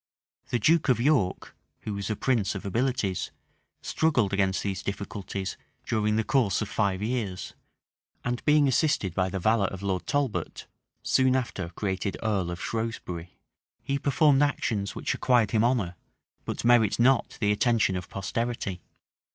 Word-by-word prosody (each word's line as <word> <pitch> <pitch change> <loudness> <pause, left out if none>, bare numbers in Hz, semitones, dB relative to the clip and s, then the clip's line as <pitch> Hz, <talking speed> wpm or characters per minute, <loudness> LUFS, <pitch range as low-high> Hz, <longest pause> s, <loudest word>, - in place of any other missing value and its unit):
The 120 - +1
duke 155 +7 +3
of 125 -3 +4
York, 125 -8 +1 0.3
who 105 - -4
was 100 0 -4
a 110 - 0
prince 110 -5 0
of 100 - -6
abilities, 110 -3 -1 0.5
struggled 125 -11 +1
against 95 -1 +1
these 95 -2 -2
difficulties 100 -1 -5 0.3
during 105 -1 +1
the 110 - +2
course 105 -3 +2
of 105 - -3
five 100 -2 0
years; 105 -5 -3 0.7
and 120 0 -2
being 150 -1 +4
assisted 130 - +1
by 95 +1 0
the 95 - -3
valor 105 +1 +2
of 95 +1 -7
Lord 95 -2 -2
Talbot, 140 -3 -1 0.4
soon 130 0 +3
after 110 -9 -2
created 95 +2 -3
earl 100 -5 0
of 85 0 -5
Shrewsbury, 100 -7 -4 0.5
he 140 0 -1
performed 145 0 +3
actions 110 -8 0
which - - -1
acquired 120 -5 +2
him 110 -1 +3
honor, 115 -8 +1 0.5
but - - -4
merit 120 -4 +4
not 125 +2 +3
the 105 -2 +2
attention 110 -2 +2
of 90 0 -5
posterity. 100 -1 -3
110 Hz, 150 wpm, -27 LUFS, 95-125 Hz, 0.7 s, of